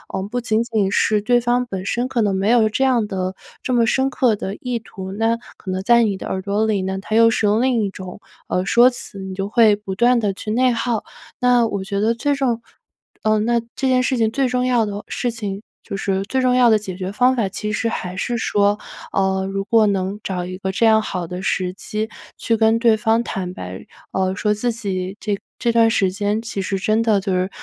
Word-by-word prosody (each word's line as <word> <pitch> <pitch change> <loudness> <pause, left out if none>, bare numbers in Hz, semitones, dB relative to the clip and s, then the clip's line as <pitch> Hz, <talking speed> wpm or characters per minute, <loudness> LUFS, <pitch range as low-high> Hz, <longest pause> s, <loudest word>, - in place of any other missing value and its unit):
嗯， 190 +1 -3
不 245 +2 -2
仅 225 -1 +1
仅 220 -5 0
是 210 0 +2
对 245 +3 +3
方 245 +1 +1
本 190 -4 -5
身 240 +4 -1
可 245 -3 -1
能 195 -2 +1
没 195 +3 0
有 230 -3 +4
这 265 +5 0
样 250 -4 +3
的 185 -1 -3 0.3
这 255 - -3
么 235 -1 +4
深 265 +4 +1
刻 245 -4 +2
的 195 0 -5
意 245 0 -3
图， 190 -3 -9
那 225 +3 0 0.2
可 190 - -9
能 185 +1 -2
在 235 +2 +5
你 205 -3 0
的 - - -8
耳 190 - -2
朵 200 +3 0
里 210 -3 +1
呢， 190 0 -2
它 215 - -3
又 230 0 +6
是 220 -1 0
用 210 +3 +3
另 250 -4 +2
一 200 - -1
种， 185 +1 -9 0.3
呃， 180 - -1
说 240 +5 +6
辞， 200 -4 -8
你 190 0 -6
就 195 +1 -3
会 220 -2 +5
不 205 -2 -6
断 240 +2 +4
地 205 -2 +1
去 215 - -6
内 250 +3 +3
耗。 230 -1 -1 0.4
那 245 -1 +4
我 200 -3 -3
觉 200 0 -3
得 220 +2 +2
最 285 +5 0
重 245 -4 0 0.6
呃， 215 0 +3
那 235 +2 +2 0.2
这 270 - -1
件 255 -1 +3
事 260 - +1
情 220 -1 +2
最 270 +2 +1
重 250 0 0
要 245 -3 +2
的 205 0 -5
事 245 - -2
情 205 -3 -5 0.2
就 200 - -5
是 195 -1 -1
最 260 +6 -1
重 250 -1 +3
要 245 -2 +5
的 220 - +5
解 190 -3 -6
决 185 +1 -4
方 250 +4 +3
法， 210 -5 0
其 210 +2 -3
实 230 - 0
还 180 -5 -4
是 235 +5 -2
说， 205 -1 +2 0.3
呃， 190 0 0
如 195 0 -2
果 225 0 +4
能 195 0 -1
找 180 -2 -3
一 185 0 -6
个 190 0 -3
这 225 +4 +1
样 220 -1 +5
好 180 -5 -4
的 180 +2 -6
时 185 -1 -1
机， 215 +2 -4 0.3
去 230 - 0
跟 220 0 +3
对 230 -2 +4
方 225 +2 +2
坦 185 -5 -4
白， 90 - -8 0.3
呃， 190 0 0
说 210 0 +1
自 235 +3 -1
己 195 -3 -4
这 205 -3 -2 0.2
这 235 - +1
段 230 -1 +5
时 195 -4 +2
间 205 +2 -1
其 225 -4 -4
实 195 +1 -2
真 215 +3 +1
的 220 -3 +3
就 190 -1 -2
是 185 +1 0
215 Hz, 260 characters per minute, -20 LUFS, 195-235 Hz, 0.6 s, 又